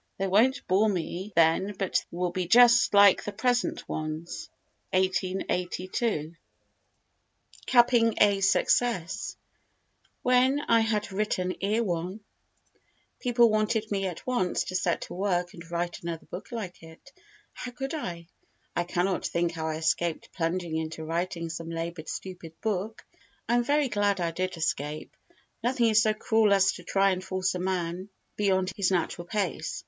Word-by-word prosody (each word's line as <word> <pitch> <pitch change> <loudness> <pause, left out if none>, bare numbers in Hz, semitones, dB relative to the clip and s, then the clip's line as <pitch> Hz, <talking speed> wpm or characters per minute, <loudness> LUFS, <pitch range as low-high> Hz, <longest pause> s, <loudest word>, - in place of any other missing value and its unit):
They 195 - -1
won't 220 +8 +3
bore 200 +4 +3
me 185 +1 -3
then 170 +5 +3
but 195 -2 0
they 170 - -9
will 180 0 0
be 180 -1 -2
just 240 +2 +6
like 200 -1 +7
the 205 - -4
present 245 +1 0
ones. 155 +2 -5 0.4
[1882.] 185 -1 -1 1.3
Capping 240 -2 +4
a 200 -1 +4
Success 230 - +1 0.9
When 255 +3 +4
I 230 -5 +3
had 215 -2 0
written 190 -2 -1
Erewhon 195 -2 -1 1.0
people 240 -2 +4
wanted 215 0 0
me 195 -1 0
at 175 -3 -7
once 245 -8 0
to 185 - -6
set 180 -2 0
to - - -7
work 180 -2 -1
and 170 -1 -12
write 175 0 -3
another 170 -1 -5
book 195 +7 -9
like 210 -7 -6
it. 165 +11 -15 0.4
How 250 - -6
could 270 +3 -5
I? 175 - -5 0.5
I 175 - 0
cannot 180 +1 0
think 170 0 0
how 160 -1 -4
I 160 - -2
escaped 160 +1 -1
plunging 170 -1 -2
into 160 0 -4
writing 170 +1 -2
some 165 0 -6
laboured 165 -1 -5
stupid 175 -4 -7
book. 215 0 -3 0.4
I 235 - +1
am 240 0 +3
very 290 +2 +2
glad 205 -4 +1
I 170 -1 0
did 185 +1 -3
escape. 150 -1 -3 0.5
Nothing 240 -1 +2
is 220 0 +5
so 215 -1 +2
cruel 220 -1 +3
as 195 -1 +4
to 180 - -10
try 195 +2 +2
and 185 0 -2
force 185 0 -1
a 180 - -3
man 180 0 -2 0.3
beyond 190 -2 +1
his 195 -3 +1
natural 175 -1 -1
pace. 200 -8 -2
185 Hz, 155 wpm, -27 LUFS, 170-215 Hz, 1.3 s, like